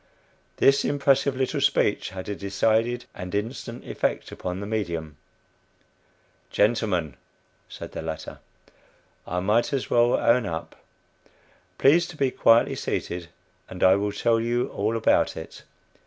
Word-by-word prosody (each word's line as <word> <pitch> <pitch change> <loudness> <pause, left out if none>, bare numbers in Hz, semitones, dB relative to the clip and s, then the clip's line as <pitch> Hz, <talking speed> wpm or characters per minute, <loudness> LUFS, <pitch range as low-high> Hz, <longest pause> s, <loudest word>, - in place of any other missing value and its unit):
This 140 0 +4
impressive 140 -1 +2
little 135 +2 -1
speech 135 -6 +2
had 95 -1 -8
a 105 - -2
decided 110 +5 0
and 90 +2 -6
instant 115 +3 -4
effect - - -2
upon 90 +1 -5
the 100 - -5
"medium." 85 -8 -3 1.3
"Gentlemen," 100 - +1 0.5
said - - -9
the - - -6
latter, 80 -1 -6 0.9
"I 90 +1 -2
might 105 +5 +2
as 135 -3 -2
well 120 0 +4
own 120 -1 +2
up. 80 -1 -5 1.0
Please 165 +5 +4
to 165 - -11
be 135 -3 +1
quietly 115 -1 +4
seated, 85 -1 -3 0.4
and 90 - -5
I 95 0 +7
will 100 +1 -1
tell 115 +2 +1
you 120 +2 0
all 110 +3 -1
about 110 - +2
it." - - -9
110 Hz, 135 wpm, -25 LUFS, 95-120 Hz, 1.3 s, I